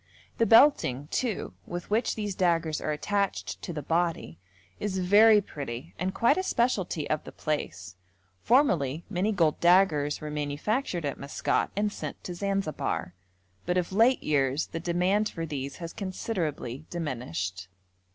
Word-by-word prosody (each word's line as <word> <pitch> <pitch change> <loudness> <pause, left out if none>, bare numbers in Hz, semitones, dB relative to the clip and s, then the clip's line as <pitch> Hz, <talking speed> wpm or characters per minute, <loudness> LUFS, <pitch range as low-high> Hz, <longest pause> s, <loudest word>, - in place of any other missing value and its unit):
The 230 - +4
belting, 225 - +5
too, 235 -6 -2
with 175 +3 -6
which 225 +3 +1
these 210 -2 -3
daggers 170 -4 +1
are 155 - -1
attached 150 - -2
to - - -5
the 150 -3 -5
body, 165 - -1 0.4
is 205 -2 -2
very 205 +4 +6
pretty 140 -3 -7
and 185 +1 -1
quite 235 - +3
a - - +2
specialty 215 - 0
of 155 - -1
the - - -9
place; 100 -11 -4 0.4
formerly 170 - +2
many 195 +3 +1
gold 165 -7 +2
daggers 170 -5 +4
were 150 0 -6
manufactured 155 - -2
at 140 - -3
Maskat 140 +1 -1
and 205 +1 0
sent - - -7
to 180 - -5
Zanzibar, 195 - -2 0.5
but 180 0 +1
of 180 +1 -1
late 230 +6 +4
years 140 0 +1
the 165 - -6
demand 180 +5 +1
for 165 - -5
these 140 -3 -5
has 170 -2 -7
considerably 165 - -4
diminished. 95 - -4
170 Hz, 150 wpm, -28 LUFS, 145-200 Hz, 0.5 s, very